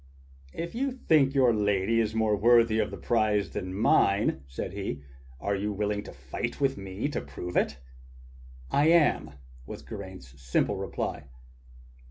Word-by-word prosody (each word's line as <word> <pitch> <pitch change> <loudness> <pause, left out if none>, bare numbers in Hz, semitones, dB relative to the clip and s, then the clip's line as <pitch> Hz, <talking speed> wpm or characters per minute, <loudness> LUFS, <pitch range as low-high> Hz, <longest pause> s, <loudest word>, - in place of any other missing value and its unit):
"If 170 +1 -4
you 270 +4 -1
think 155 - +2
your 130 -3 +5
lady 105 +2 +2
more 110 -1 +2
worthy 115 +1 +4
of 105 - +1
the - - -7
prize 110 -3 +1
than 90 - -4
mine," 100 -5 +3
said 65 - -5
he, 70 0 -4 0.4
"are 100 +5 -1
you 105 +2 -2
willing 105 0 -1
to - - -8
fight 65 - -5
with 135 -1 +1
me 95 +5 -4
to 145 - -3
prove 90 0 -7
it.?*" 70 - +1 0.9
"I 145 +2 +3
am," 155 - +3 0.3
was - - -8
Geraint's 95 - -10
simple 65 0 0
reply. 70 - -4
105 Hz, 150 wpm, -28 LUFS, 95-120 Hz, 0.9 s, your